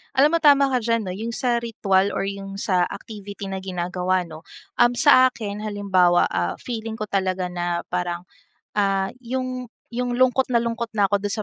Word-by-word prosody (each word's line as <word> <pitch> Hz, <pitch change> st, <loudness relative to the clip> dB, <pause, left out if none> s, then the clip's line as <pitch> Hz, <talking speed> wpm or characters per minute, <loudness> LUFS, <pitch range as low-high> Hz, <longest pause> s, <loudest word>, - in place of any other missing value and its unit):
Alam 295 Hz, +5 st, +5 dB
mo, -, -, +2 dB
tama 280 Hz, -2 st, +6 dB
ka 255 Hz, -4 st, 0 dB
diyan 230 Hz, 0 st, +1 dB
'no, 180 Hz, -, -3 dB
yung 225 Hz, +4 st, -4 dB
sa 245 Hz, 0 st, 0 dB
ritwal 200 Hz, -4 st, +1 dB
or 195 Hz, -, -2 dB
yung 195 Hz, 0 st, -6 dB
sa 180 Hz, -4 st, +2 dB
activity 205 Hz, -1 st, -7 dB
na 190 Hz, -1 st, -5 dB
ginagawa 180 Hz, 0 st, -1 dB
'no. 160 Hz, 0 st, -11 dB, 0.3 s
Um, 240 Hz, -, +5 dB
sa 255 Hz, 0 st, +6 dB
akin 210 Hz, -3 st, -6 dB
halimbawa, 190 Hz, -4 st, +3 dB
ah, 85 Hz, 0 st, -2 dB
feeling 225 Hz, -2 st, -5 dB
ko 215 Hz, -, -3 dB
talaga 185 Hz, -2 st, -1 dB
na 175 Hz, -1 st, -2 dB
parang, 180 Hz, 0 st, -3 dB, 0.4 s
ah, 195 Hz, -2 st, +1 dB
yung, 255 Hz, 0 st, -4 dB, 0.2 s
yung 245 Hz, +1 st, -2 dB
lungkot 255 Hz, +1 st, +3 dB
na 235 Hz, -2 st, +2 dB
lungkot 235 Hz, 0 st, -2 dB
na 200 Hz, -1 st, +2 dB
ako 200 Hz, -, +3 dB
do'n 205 Hz, +1 st, -2 dB
205 Hz, 185 wpm, -23 LUFS, 185-240 Hz, 0.4 s, tama